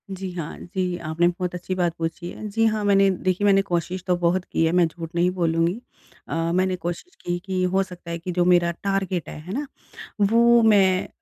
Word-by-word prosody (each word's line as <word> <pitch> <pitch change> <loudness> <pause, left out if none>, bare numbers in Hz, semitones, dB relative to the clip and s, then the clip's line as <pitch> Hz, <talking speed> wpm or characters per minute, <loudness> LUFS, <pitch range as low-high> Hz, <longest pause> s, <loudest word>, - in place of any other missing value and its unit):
जी, 190 0 -5
हाँ। 165 -3 -6
जी, 180 -1 -3
आपने 170 +1 0
बहुत 180 0 -2
अच्छी 180 +1 -4
बात 175 -2 0
पूछी 165 +2 -4
है। 215 - -7
जी, 225 +2 +1
हाँ 215 -1 +1
मैंने 195 -1 +5
देखिए 185 +1 0
मैंने 195 -1 +5
कोशिश 180 -1 -3
तो 180 - +3
बहुत 175 +1 +1
की 165 - 0
है 160 - +2
मैं 180 0 +4
झूठ 165 0 -8
नहीं 175 +1 +3
बोलूँगी। 170 +2 0 0.5
अ, - - -4 0.2
मैंने 185 +1 +1
कोशिश 175 - -6
की 175 0 -1
कि 190 -2 -1
हो 190 +1 +2
सकता 180 -3 -10
है 170 - -2
कि 180 +2 -5
जो 175 0 +1
मेरा 175 -1 +4
टारगेट 195 -3 -1
है, - - -8
है 180 +5 -7
ना? 285 +5 -2 0.6
वो 235 +3 +5
मैं 195 -4 +4
180 Hz, 215 wpm, -23 LUFS, 175-195 Hz, 0.6 s, मैंने